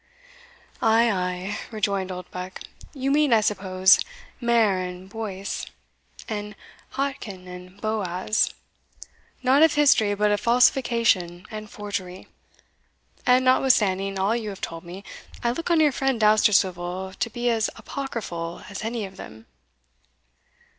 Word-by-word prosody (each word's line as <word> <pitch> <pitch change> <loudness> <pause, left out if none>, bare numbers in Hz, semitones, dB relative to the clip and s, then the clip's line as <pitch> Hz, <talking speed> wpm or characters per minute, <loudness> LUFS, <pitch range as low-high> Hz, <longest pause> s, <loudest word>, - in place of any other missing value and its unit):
"Ay, 230 +1 +4
ay," 180 +1 -2
rejoined 200 -3 -1
Oldbuck, 180 0 -7 0.3
"you 270 -1 -2
mean, 295 -1 +3
I 225 -2 +5
suppose, 190 -2 +4 0.4
Mair 230 -5 +3
and 180 0 -6
Boece, 200 -2 -5 0.6
the 210 -1 -5 0.4
Jachin 240 -9 -4
and 180 +2 -11
Boaz, 210 -1 0 0.9
not 265 +3 +4
of 320 -2 +5
history 235 -8 +4
but 210 +1 +2
of 205 - +1
falsification 230 -8 +2
and 215 -1 -7
forgery. 190 -3 -6 1.0
And 255 +1 +5
notwithstanding 195 -7 +3
all 195 +4 +1
you 225 -3 -3
have 195 - -8
told 165 0 -6
me, 180 +3 -9 0.4
I 235 - +2
look 330 +8 -4
on 335 -2 +4
your 300 -2 +5
friend 270 -2 0
Dousterswivel 190 -4 +2
to 235 - 0
be 240 +1 -1
as 225 -1 +1
apocryphal 195 -11 -5
as 200 - -6
any 225 -1 -2
of 190 0 -12
them." 110 +1 -11
210 Hz, 125 wpm, -24 LUFS, 185-235 Hz, 1.0 s, I